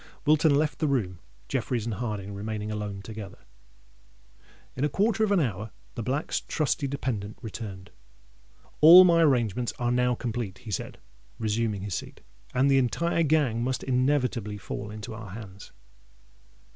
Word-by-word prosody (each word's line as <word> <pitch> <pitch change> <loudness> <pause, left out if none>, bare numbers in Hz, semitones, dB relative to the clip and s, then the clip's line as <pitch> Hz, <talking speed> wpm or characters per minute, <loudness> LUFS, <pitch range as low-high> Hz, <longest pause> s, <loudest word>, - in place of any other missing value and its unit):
Wilton 155 0 +4
left 150 -1 0
the 155 - +1
room, 100 - -1 0.3
Jeffreys 115 - -1
and 115 - -2
Harding 105 -3 -4
remaining 105 +1 -4
alone 105 -2 -4
together. 105 -2 -8 1.4
In 130 - -2
a 150 - +2
quarter 215 +6 +1
of 210 - +1
an 200 - +4
hour 110 - -2 0.2
the - - -5
Black's 130 +6 -1
trusty 150 -2 -1
dependant 110 -7 -3
returned. 105 -4 -7 0.9
"All 170 +4 +11
my 170 -2 +5
arrangements 125 - +2
are 120 0 0
now 125 0 +2
complete," 115 -5 -4
he 120 -4 -9
said, - - -4 0.4
resuming 110 -2 -1
his 100 -2 -4
seat; - - -6 0.3
"and 130 +2 +2
the 135 -1 +5
entire 170 +7 +1
gang 145 -7 +2
must 130 +1 -2
inevitably 125 -5 0
fall 100 +1 -6
into 105 0 -7
our 110 -2 -8
hands." 100 -1 -10
120 Hz, 150 wpm, -27 LUFS, 105-140 Hz, 1.4 s, All